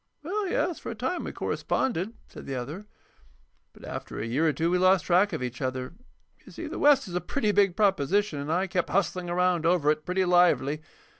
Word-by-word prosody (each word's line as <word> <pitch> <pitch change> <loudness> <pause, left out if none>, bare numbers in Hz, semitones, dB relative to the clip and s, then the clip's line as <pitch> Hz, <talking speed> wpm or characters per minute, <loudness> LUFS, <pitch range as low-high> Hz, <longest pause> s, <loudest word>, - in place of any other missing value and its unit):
"Well, 395 +5 -2
yes, 360 -1 -1
for - - -7
a 230 - -5
time 260 +11 -3
we - - -4
corresponded," 225 -3 -2
said - - -12
the 135 - -3
other. 150 +12 -6 0.8
"But - - -14
after - - -7
a 105 - -3
year 135 +8 +1
or - - +4
two 165 +4 -1
we 180 - +2
lost 185 0 +4
track 185 +4 +3
of 160 -6 -3
each 125 -1 -5
other. 130 +1 -3 0.5
You - - -14
see, - - -7
the - - -5
West 285 -5 +4
is 180 - -8
a 180 - -1
pretty 215 +5 0
big 200 -3 +3
proposition, 195 -3 +1
and 145 +2 -4
I 180 +3 +1
kept 180 -1 -1
hustling 180 -1 0
around 180 -1 +1
over 165 -3 +3
it 155 0 -2
pretty 185 +2 0
lively. 175 -5 +3
180 Hz, 215 wpm, -27 LUFS, 155-205 Hz, 0.8 s, or